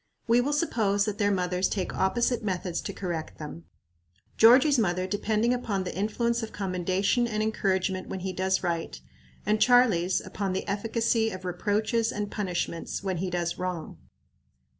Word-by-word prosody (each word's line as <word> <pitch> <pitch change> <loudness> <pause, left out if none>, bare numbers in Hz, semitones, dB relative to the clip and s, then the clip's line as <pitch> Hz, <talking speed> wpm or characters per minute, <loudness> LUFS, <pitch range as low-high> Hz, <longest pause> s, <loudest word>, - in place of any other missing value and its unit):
We 235 +1 +4
will 280 +4 -1
suppose 215 -10 +1
that 210 -2 -3
their 205 -1 +3
mothers 180 -1 0
take 190 -3 -2
opposite 235 +5 +1
methods 180 -3 -2
to - - -5
correct 175 -5 -5
them; 145 - -8 0.7
Georgie's 255 +5 +6
mother 185 -3 +1
depending 215 +4 +1
upon 210 -6 -2
the 180 - -5
influence 235 +4 0
of 225 - -5
commendation 190 +5 0
and 215 -2 -1
encouragement 190 -3 0
when 190 - -4
he 190 0 -3
does 190 +1 0
right, 170 -2 -2 0.5
and 210 0 +1
Charlie's, 220 -8 +4
upon 195 -2 -3
the 190 - -3
efficacy 225 +2 +1
of 185 -2 -8
reproaches 215 +5 0
and 205 0 -4
punishments 180 -3 -3
when 190 -2 -1
he 185 +2 -2
does 175 -1 -2
wrong. 180 -3 -4
200 Hz, 160 wpm, -27 LUFS, 185-225 Hz, 0.7 s, Georgie's